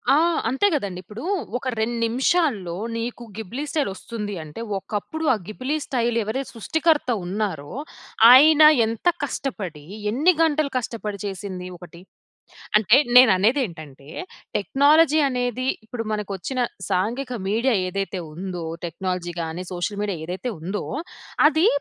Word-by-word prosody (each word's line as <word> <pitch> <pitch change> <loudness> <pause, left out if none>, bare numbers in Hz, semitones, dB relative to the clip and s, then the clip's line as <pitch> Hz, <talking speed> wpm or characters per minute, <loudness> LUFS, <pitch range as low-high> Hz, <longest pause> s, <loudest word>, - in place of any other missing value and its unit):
ఆ! - - +5 0.3
అంతే 270 +11 +2
గదండీ. 195 -10 -2
ఇప్పుడు, 210 - -9 0.3
ఒక 260 - -6
2 235 +2 0
నిమిషాల్లో 240 - +1 0.2
నీకు 240 +1 -4
గిబ్లీ 230 +7 -5
స్టైలొస్తుంది 210 -5 -3
అంటే, 155 +9 -9 0.2
ఒకప్పుడు 210 +11 -5
ఆ - - +2
గిబ్లీ 255 +7 -3
స్టైల్ 240 -2 0
ఎవరే 225 +6 -2
సృష్టికర్త 310 +5 +1 0.2
ఉన్నారో, 185 -7 -3 0.6
ఆయన 305 +4 +8 0.2
ఎంత 225 +8 -3 0.2
కష్టపడి, 190 - -4 0.3
ఎన్ని 310 +10 +4
గంటలు 310 -3 +2
కష్టపడి 215 -4 -4
చేసింది 185 -2 -5
ఒకటి. 175 0 -13 0.8
అంటే 220 +5 +5 0.2
నేననేదేంటంటే, 185 - +3 0.5
టెక్నాలజీ 295 - +4
అనేది 250 0 -2 0.2
ఇప్పుడు, 230 0 -5
మనకొచ్చిన 210 +5 -3 0.3
సాంఘిక 235 +8 -1 0.2
మీడియా 230 +4 +2
ఏదైతే 195 -1 -3
ఉందో 180 -1 -5 0.2
టెక్నాలజీ 175 0 -4
గాని, 165 +3 -5
సోషల్ 185 +3 -3
మీడియా 200 -5 -2
ఏదైతే 190 +8 -4
ఉందో, 190 +5 -3 0.6
అది 320 +5 +2
220 Hz, 120 wpm, -23 LUFS, 185-265 Hz, 0.8 s, ఆయన